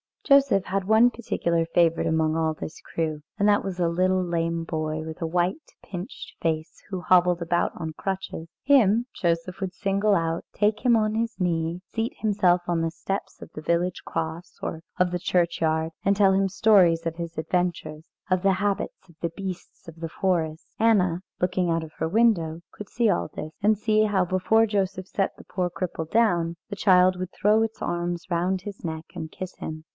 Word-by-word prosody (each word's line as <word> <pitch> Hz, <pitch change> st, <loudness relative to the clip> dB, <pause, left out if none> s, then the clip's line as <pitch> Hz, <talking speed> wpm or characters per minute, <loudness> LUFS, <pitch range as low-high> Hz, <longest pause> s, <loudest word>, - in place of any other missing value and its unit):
Joseph 275 Hz, -9 st, +4 dB
had 195 Hz, 0 st, -1 dB
one 220 Hz, +4 st, +5 dB
particular 170 Hz, -8 st, -1 dB
favourite 165 Hz, 0 st, +2 dB
among 160 Hz, -1 st, +1 dB
all 160 Hz, -1 st, +1 dB
this 155 Hz, -, -8 dB
crew, 155 Hz, -2 st, -3 dB, 0.2 s
and 205 Hz, -, +2 dB
that 205 Hz, -, +3 dB
was 190 Hz, -2 st, -5 dB
a 170 Hz, -1 st, +2 dB
little 185 Hz, +2 st, +2 dB
lame 170 Hz, -1 st, -1 dB
boy 155 Hz, -1 st, -3 dB
with 160 Hz, +1 st, -8 dB
a 165 Hz, -, 0 dB
white, 180 Hz, -, -1 dB
pinched 185 Hz, +5 st, -8 dB
face, 160 Hz, 0 st, -2 dB
who 190 Hz, -3 st, -4 dB
hobbled 180 Hz, -1 st, +4 dB
about 170 Hz, +1 st, 0 dB
on 160 Hz, -2 st, -5 dB
crutches. 190 Hz, -2 st, -4 dB, 0.2 s
Him 240 Hz, -4 st, +4 dB
Joseph 170 Hz, +1 st, -1 dB
would 190 Hz, -2 st, -3 dB
single 200 Hz, +2 st, +1 dB
out, 165 Hz, -1 st, -1 dB
take 210 Hz, +4 st, 0 dB
him 240 Hz, -2 st, +6 dB
on 215 Hz, -1 st, +1 dB
his 230 Hz, 0 st, -2 dB
knee, 170 Hz, -1 st, -1 dB
seat 225 Hz, +1 st, -1 dB
himself 195 Hz, -5 st, +2 dB
on 170 Hz, -1 st, +1 dB
the 165 Hz, 0 st, -1 dB
steps 195 Hz, +4 st, -5 dB
of -, -, -10 dB
the 155 Hz, -, -7 dB
village 170 Hz, +3 st, 0 dB
cross 165 Hz, +2 st, -4 dB
or 160 Hz, -, -4 dB, 0.2 s
of 180 Hz, -1 st, +2 dB
the 180 Hz, -, -1 dB
churchyard, 165 Hz, -2 st, +1 dB
and 200 Hz, +1 st, +4 dB
tell 195 Hz, -1 st, +4 dB
him 195 Hz, 0 st, +2 dB
stories 185 Hz, -5 st, +4 dB
of 165 Hz, 0 st, -3 dB
his 170 Hz, -1 st, -6 dB
adventures, 160 Hz, -1 st, -2 dB, 0.2 s
of 185 Hz, -1 st, +2 dB
the 195 Hz, 0 st, +3 dB
habits 195 Hz, -1 st, -2 dB
of 170 Hz, -, -19 dB
the 170 Hz, -, 0 dB
beasts 190 Hz, -4 st, -7 dB
of 165 Hz, 0 st, -10 dB
the 165 Hz, 0 st, -4 dB
forest. 165 Hz, -3 st, -1 dB
Anna, 185 Hz, -6 st, +3 dB, 0.2 s
looking 180 Hz, 0 st, +1 dB
out 165 Hz, -1 st, 0 dB
of 155 Hz, -1 st, -10 dB
her 160 Hz, -, -1 dB
window, 170 Hz, -5 st, +2 dB
could 210 Hz, -, -10 dB
see 235 Hz, -2 st, +1 dB
all 180 Hz, -, +1 dB
this; 155 Hz, -, -5 dB
and 210 Hz, +1 st, +3 dB
see 215 Hz, +1 st, +2 dB
how 195 Hz, -3 st, +2 dB
before 185 Hz, +5 st, +3 dB
Joseph 195 Hz, -3 st, -1 dB
set 195 Hz, 0 st, -1 dB
the -, -, -13 dB
poor 180 Hz, -1 st, -2 dB
cripple 170 Hz, -3 st, -4 dB
down, 175 Hz, -7 st, +2 dB
the 200 Hz, -, -4 dB
child 185 Hz, -2 st, +4 dB
would 185 Hz, 0 st, -5 dB
throw 210 Hz, +2 st, +3 dB
its 225 Hz, 0 st, -4 dB
arms 175 Hz, 0 st, -2 dB
round 180 Hz, +2 st, 0 dB
his 200 Hz, +1 st, -9 dB
neck 160 Hz, -1 st, -4 dB
and 160 Hz, -3 st, -6 dB
kiss 185 Hz, -1 st, -7 dB
him. 155 Hz, 0 st, -6 dB
180 Hz, 195 wpm, -25 LUFS, 165-200 Hz, 0.2 s, him